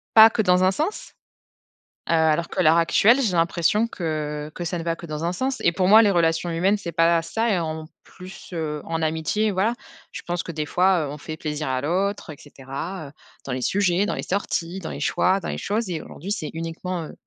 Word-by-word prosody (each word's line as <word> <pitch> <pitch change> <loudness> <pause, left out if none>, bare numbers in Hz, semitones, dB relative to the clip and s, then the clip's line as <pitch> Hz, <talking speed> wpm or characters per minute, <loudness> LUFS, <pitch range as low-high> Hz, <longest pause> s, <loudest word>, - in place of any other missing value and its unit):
pas 220 0 +10
que 220 - 0
dans 180 -2 +3
un 185 - +4
sens. 315 - -3 1.0
Heu, - - +3
alors 160 +1 +2
que 185 - -1
l'heure 160 0 +5
actuelle, 215 +9 +4
j'ai 210 -7 0
l'impression 170 +6 +2
que 150 -5 -4
que 175 - -5
ça 175 +2 -2
ne 165 - -5
va 165 0 -1
que 170 - -10
dans 155 +1 -5
un 175 - -1
sens 260 +6 -2
et - - +3
pour 185 +1 0
moi 220 +3 +8
les 205 - +4
relations 165 -1 +1
humaines 190 +5 +2
c'est 175 -4 -6
pas 165 0 +3
ça, 225 +7 -1
et 190 -4 +2
en 160 -1 -4 0.2
plus, 185 +1 -12
heu, 150 -3 -3
en 165 0 -3
amitié, 160 +7 0
voilà. 200 +5 +1 0.4
Je - - -7
pense 175 0 -1
que - - -6
des 155 -1 -3
fois, 180 -3 +2
heu, - - -6
on 150 - -7
fait 155 +1 -7
plaisir 150 -1 -4
à 130 0 -1
l'autre 185 +3 -1
et 145 - -10
cetera, 145 +5 -7
heu, - - -16 0.3
dans 135 - -3
les 130 - -3
sujets, 190 +3 +1
dans - - -2
les - - -4
sorties, 185 -2 -2
dans 170 - -6
les - - -6
choix, 185 +6 +2
dans - - -6
les - - -3
choses 210 0 -2
et 160 -3 -3
aujourd'hui, 195 +6 -8
c'est 155 -7 -3
uniquement, 165 +2 -4
heu, - - -10
170 Hz, 235 wpm, -23 LUFS, 160-195 Hz, 1.0 s, pas